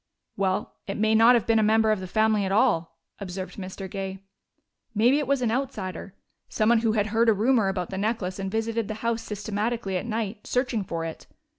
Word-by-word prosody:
"Well, 190 -1 -1
it 195 - -3
may 220 +1 +2
not 225 +3 +7
have 235 - +1
been 225 -1 +3
a - - +4
member 220 +1 +3
of 215 - +1
the 185 - -6
family 215 +1 +2
at 190 - -2
all," 165 -5 +2 0.2
observed 185 -1 -6
Mr. 190 0 -6
Gay. 195 0 -5 0.8
"Maybe 245 +7 +4
it 290 - -2
was 275 -2 +1
an 225 - +1
outsider, 205 -7 -4 0.3
someone 225 +2 +3
who 225 -1 +1
had 210 -2 +1
heard 230 +1 +4
a - - +6
rumor 225 +1 +2
about 185 -2 -2
the 190 - -3
necklace 200 -3 -2
and 195 0 -3
visited 225 +1 -1
the 215 - -4
house 230 -1 0
systematically 210 -1 -2
at 180 - -5
night, 220 -2 -3
searching 250 -4 0
for 165 -3 -4
it. 160 - -8
215 Hz, 205 wpm, -26 LUFS, 195-230 Hz, 0.8 s, not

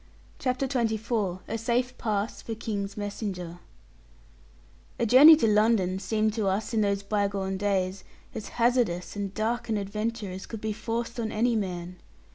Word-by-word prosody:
CHAPTER 255 +1 0
XXIV 220 -6 -1
A 225 - -3
SAFE 245 +3 0
PASS 210 -1 -2
FOR 225 - -5
KING'S 205 -2 -4
MESSENGER 195 -4 -5 1.4
A - - +1
journey 275 +8 +9
to 295 - +1
London 210 -3 +3
seemed 215 +2 0
to 215 -3 -1
us 205 +5 -1
in 220 - +2
those 200 -1 0
bygone 200 -2 -1
days 190 -1 -1 0.3
as 220 - -6
hazardous 235 -8 +1
and 200 -1 -3
dark 230 +2 -1
an 220 - +1
adventure 210 +1 -3
as 190 +1 -7
could 225 - -6
be 215 0 -2
forced 235 +2 -4
on 225 -1 -2
any 235 +2 +1
man. 180 -3 -3
215 Hz, 155 wpm, -27 LUFS, 195-230 Hz, 1.4 s, journey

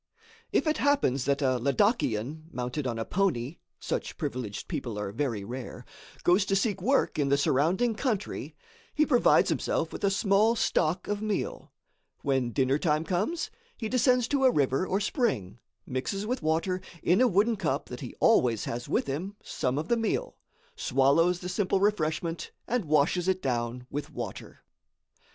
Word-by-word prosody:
If - - +2
it 310 0 +1
happens 275 - +2
that 140 +1 +1
a 130 -2 +2
Ladakian, 145 - 0
mounted 125 +3 -3
on 120 -2 -2
a 115 - -2
pony 170 -7 0 0.2
(such - - -3
privileged 110 -5 -4
people 115 -4 -4
are 105 -1 -3
very 115 -4 -2
rare), 125 +4 -7 0.4
goes 180 +3 +4
to 195 - +1
seek 195 -1 0
work 265 - +1
in 140 -1 +1
the 140 - +4
surrounding 170 - +2
country, 215 -3 -3 0.4
he 305 - +4
provides 250 -5 +4
himself - - -1
with - - -7
a 200 - +4
small 200 +3 +3
stock 175 -4 0
of 205 0 -2
meal; 215 -2 -3 0.5
when 135 -3 +1
dinner 135 +3 +1
time 155 -2 +1
comes, 215 - -1 0.3
he 225 - -3
descends 250 0 +3
to 280 -2 +1
a 260 - +7
river 140 - +1
or 195 - +1
spring, 195 - -1 0.3
mixes 195 +11 -3
with 250 +3 -2
water, 165 +4 0 0.2
in 180 +7 +4
a 255 - +6
wooden 215 +3 +3
cup 195 -7 -1
that - - -6
he - - -7
always 115 -4 +3
has 120 +1 -5
with - - +1
him, 170 +9 -4
some 125 +1 -2
of 155 +2 -2
the 235 - +2
meal, 235 - -1 0.4
swallows 145 +7 +2
the 180 - -5
simple 190 +1 0
refreshment 165 -4 0 0.2
and 240 -4 0
washes 155 +4 +2
it 190 0 +2
down 125 -3 -2
with 145 0 -4
water. - - -7
165 Hz, 170 wpm, -28 LUFS, 130-210 Hz, 0.5 s, a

